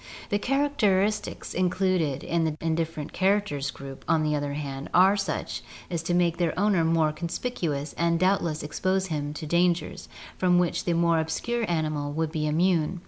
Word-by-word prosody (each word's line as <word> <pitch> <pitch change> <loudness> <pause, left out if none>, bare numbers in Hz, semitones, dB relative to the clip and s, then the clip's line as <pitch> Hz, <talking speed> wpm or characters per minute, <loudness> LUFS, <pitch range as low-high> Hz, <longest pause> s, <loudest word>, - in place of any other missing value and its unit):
The 205 - +1
characteristics 215 -7 0
included 180 -5 +1
in 170 -1 0
the 155 -1 -1
"indifferent 160 -2 -2
charac 200 +2 +2
ters" 140 -5 -3
group, 135 0 -9
on 160 -1 +3
the 150 0 +1
other 145 -1 -2
hand, 140 -1 -5
are 190 +3 +6
such 195 -1 -3 0.3
as 170 0 -3
make 175 -1 +2
their 170 -3 0
owner 200 -4 +3
more 160 -1 +2
conspicuous 165 - -3
and 170 0 +2
doubtless 185 -5 +1
expose 185 +5 0
him 145 -1 -2
to 155 - -6
dangers 170 +2 0 0.3
from 180 -1 +4
which 175 -1 +1
the 175 - +1
more 170 -1 +3
obscure 230 +8 -2
animal 155 -3 -1
would 160 0 -1
be 155 -2 -1
immune. 170 +1 +1
170 Hz, 165 wpm, -26 LUFS, 155-185 Hz, 0.3 s, are